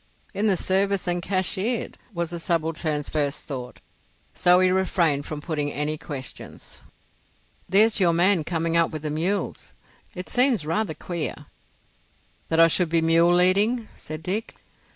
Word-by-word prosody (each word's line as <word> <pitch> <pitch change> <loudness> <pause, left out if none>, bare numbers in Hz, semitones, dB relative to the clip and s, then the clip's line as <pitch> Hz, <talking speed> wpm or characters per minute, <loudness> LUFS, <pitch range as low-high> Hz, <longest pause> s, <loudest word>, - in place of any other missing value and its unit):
"In 210 +2 0
the 195 -3 +2
service 195 +1 +1
and 175 0 0
cashiered," 190 +5 -1 0.2
was 170 -3 -3
the 170 - -5
subaltern's 160 -3 -1
first 145 -2 -2
thought, 125 -3 -7 0.5
so 180 0 +4
he 185 0 +4
refrained 170 -6 +1
from 150 -1 -5
putting 150 -2 -2
any 150 +1 -1
questions. 140 -3 -9 0.9
"There's 215 +4 +4
your 180 -3 +4
man 175 +1 +3
coming 165 0 -1
up 165 -1 +4
with 155 -1 -7
the 150 - -2
mules. 175 +7 -2 0.4
It 180 0 -6
seems 250 - +2
rather 165 +1 -1
queer——" 170 +1 -5 1.0
"That 165 - +1
I 165 - +9
should 170 +1 +1
be 165 0 +2
mule 165 +2 +4
leading?" 205 +6 +2
said 155 +1 -8
Dick. 205 +7 -3
170 Hz, 150 wpm, -24 LUFS, 155-190 Hz, 1.0 s, I